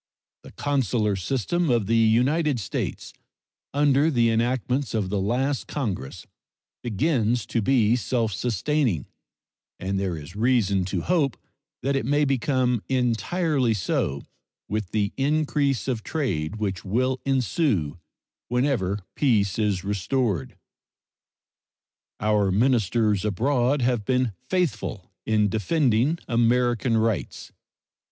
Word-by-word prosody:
The - - -13
consular 120 -7 0
system 135 - -1
of 120 -4 +2
the 115 +4 +1
United 125 +6 +3
States, 100 - -4 0.6
under 145 +1 +3
the 120 -6 +2
enactments 125 +3 0
of 100 -4 -1
the 100 -2 0
last 130 +7 -1
Congress, 95 - -4 0.6
begins 120 -1 0
to 115 - -1
be 115 -1 +3
self 115 -2 -1
sustaining, 120 - 0 0.7
and 95 +1 -2
there 95 -4 -2
is 75 +5 -10
reason 105 -5 +2
to 95 - -2
hope 155 -8 +1 0.5
that 140 +1 +1
it 135 -3 -1
may 145 +1 +3
become 130 -3 +1
entirely 130 +1 +1
so 100 - -1 0.4
with 105 -3 -3
the 105 -1 -1
increase 140 -4 0
of 125 -4 -1
trade 105 - -2
which 100 -4 -3
will 130 +6 0
ensue 125 - 0 0.5
whenever 120 -6 0
peace 110 -8 +2
is 100 -4 0
restored. 100 - -1 1.6
Our 105 -2 +2
ministers 110 -2 +2
abroad 125 +5 +1
have 120 -3 +1
been 125 +1 +1 0.2
faithful 165 - -2 0.2
in 105 -1 +3
defending 120 - +1
American 120 0 +2
rights. 110 - -2
120 Hz, 115 wpm, -25 LUFS, 105-135 Hz, 1.6 s, United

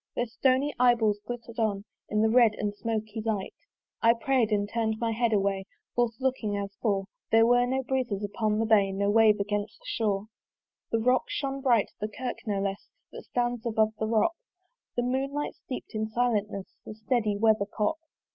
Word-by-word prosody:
Their 240 - 0
stony 260 +4 +1
eye 245 -1 +6
balls 215 -3 +1
glitter'd 235 -1 -6
on 205 -3 0 0.2
In 210 +1 +2
the 220 - +4
red 230 -3 +5
and 205 -1 -2
smoky 220 0 -3
light. 215 -4 -2 0.5
I 230 +1 +5
pray'd 250 -4 +2
and 205 -1 +1
turn'd 220 0 -1
my 230 -1 0
head 230 +1 +1
away 195 -2 +1 0.3
Forth 240 -2 +1
looking 250 -6 -1
as 200 0 -4
before. 200 -2 -1 0.3
There 225 0 +6
was 245 +1 +4
no 265 +1 0
breeze 260 -1 0 0.2
upon 210 +1 0
the 225 - +1
bay, 205 -3 +4
No 200 +1 0
wave 215 -1 +5
against 205 +1 -2
the - - -23
shore. 210 - -1 0.6
The 230 - +1
rock 250 +3 +2
shone 275 -1 -3
bright, 240 -6 +3
the 210 - -2
kirk 245 +3 -5
no 200 -2 0
less 195 0 -3 0.2
That - - -10
stands 240 -1 -1
above 220 -2 +1
the 220 - 0
rock: 230 +9 +2 0.6
The 245 - +1
moonlight 275 +4 -1
steep'd 255 - -8
in 220 0 -1
silentness 215 -4 0 0.2
The 215 - -8
steady 215 -2 0
weathercock. 215 +5 +1
220 Hz, 185 wpm, -28 LUFS, 210-245 Hz, 0.6 s, eye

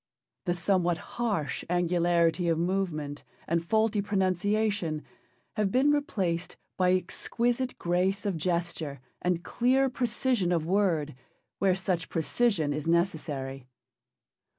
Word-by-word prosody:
The 175 -2 +1
somewhat 175 -1 +1 0.2
harsh 200 - -1
angularity 175 0 +2
of 165 -1 +2
movement 165 -5 -2 0.2
and 170 0 +1
faulty 220 +3 +2
pronunciation 195 -3 0 0.5
have 210 -2 +1
been 270 +5 +4
replaced 190 -13 -1 0.2
by 180 -1 +3
exquisite 240 +7 -1
grace 185 +4 0
of 200 -3 0
gesture 170 -4 -2 0.2
and 175 -1 0
clear 260 +2 +2
precision 240 -5 0
of 165 -3 +1
word, 170 -6 +1 0.5
where 190 -2 +3
such 185 -3 -1
precision 165 -2 +1
is 150 +1 -4
necessary. 150 -6 -1
180 Hz, 110 wpm, -28 LUFS, 165-205 Hz, 0.5 s, been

